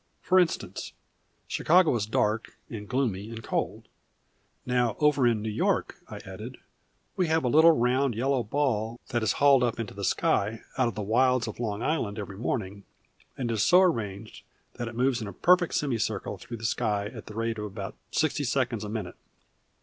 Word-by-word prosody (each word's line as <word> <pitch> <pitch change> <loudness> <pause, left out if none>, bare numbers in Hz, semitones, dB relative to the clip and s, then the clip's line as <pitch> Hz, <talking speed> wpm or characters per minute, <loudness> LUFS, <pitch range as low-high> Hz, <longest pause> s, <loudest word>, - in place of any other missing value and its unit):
For 185 0 +4
instance, 175 -2 -1 0.5
Chicago 175 -1 +4
is 105 -3 -1
dark, 110 0 -1
and 105 -3 -7
gloomy, 115 -6 -1
and 115 -1 -8
cold. - - -3 0.8
Now 125 -3 +1
over 150 -4 +4
in 110 -3 +1
New 110 - -2
York," 110 - 0
I - - -7
added, - - -8 0.6
"we 180 - +1
have 160 -1 +2
a - - +1
little 160 +6 +7
round, 125 -1 +1
yellow 130 +3 +1
ball 115 -2 -1
that 120 - 0
is 110 -5 +1
hauled 140 -2 +5
up 120 -2 0
into 115 -3 -4
the 100 - -7
sky 105 +3 +1
out 130 -2 +2
of 115 - -4
the 105 - -3
wilds 125 +3 +2
of 110 - -7
Long 110 -2 -2
Island 120 -10 -1
every 100 -2 -6
morning, 100 -4 -3 0.5
and 120 -3 -2
it - - 0
is 110 - 0
so 180 - +6
arranged 110 - -2 0.3
that 120 - -3
it 115 - -7
moves 125 0 +1
in 110 - -4
a 100 - -7
perfect 180 - +3
semicircle 110 -7 -1
through 115 +6 -7
the 115 - -7
sky 105 -3 0
at 110 +1 -8
the 105 - -9
rate 115 -1 -2
of 105 - -3
about 100 -1 -6 0.2
sixty 155 -1 0
seconds 125 -4 0
a 105 - -5
minute. 105 -5 -5
115 Hz, 190 wpm, -27 LUFS, 105-135 Hz, 0.8 s, little